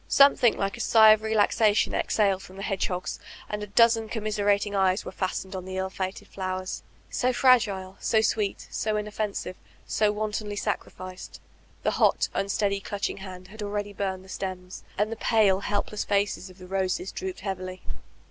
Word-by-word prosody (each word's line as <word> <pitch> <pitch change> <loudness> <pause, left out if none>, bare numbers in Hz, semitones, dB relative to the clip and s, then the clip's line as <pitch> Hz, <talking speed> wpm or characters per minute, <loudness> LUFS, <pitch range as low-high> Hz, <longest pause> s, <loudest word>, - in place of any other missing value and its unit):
Some 280 0 +7
thing 240 -3 +3
like 195 +3 -2
a - - -4
sigh 220 -2 +7
of 215 0 +4
relaxation 220 0 +3
exhaled 195 -3 +1
from 185 - -12
the 195 - -7
hedge 195 -2 0
hogs, 180 -1 -4 0.3
and 210 0 -4
a 210 - -5
dozen 225 +1 +4
commiserating 205 -2 0
eyes 190 0 +2
were - - -5
fastened 190 0 -3
on 185 - -4
the 185 0 -6
ill 190 0 -2
fated 190 0 -4
flowers, 185 -1 -4 0.2
— - - -32
so 255 0 +3
fragile, 215 -7 +3
so 220 - +2
sweet, 215 -1 0
so 215 -1 -1
inoffensive, 210 -3 -3 0.3
so 210 -1 +2
wantonly 210 0 -3
sacrificed. 185 -2 -5 0.4
The - - +2
hot, - - +4
unsteady, 200 0 0
clutching 200 0 -3
hand 185 -1 -9
had 215 +2 -10
already 205 0 -3
burned 190 -1 -3
the - - -16
stems, 185 -1 -6
and 210 +2 +1
the 225 - -4
pale, 210 -5 +3
help 205 0 -1
less 210 - -2
faces 200 -2 0
of 185 - -15
the 185 - -11
roses 190 0 -1
drooped 375 -1 -5
heavily. 185 -2 -5
200 Hz, 180 wpm, -27 LUFS, 190-215 Hz, 0.4 s, Some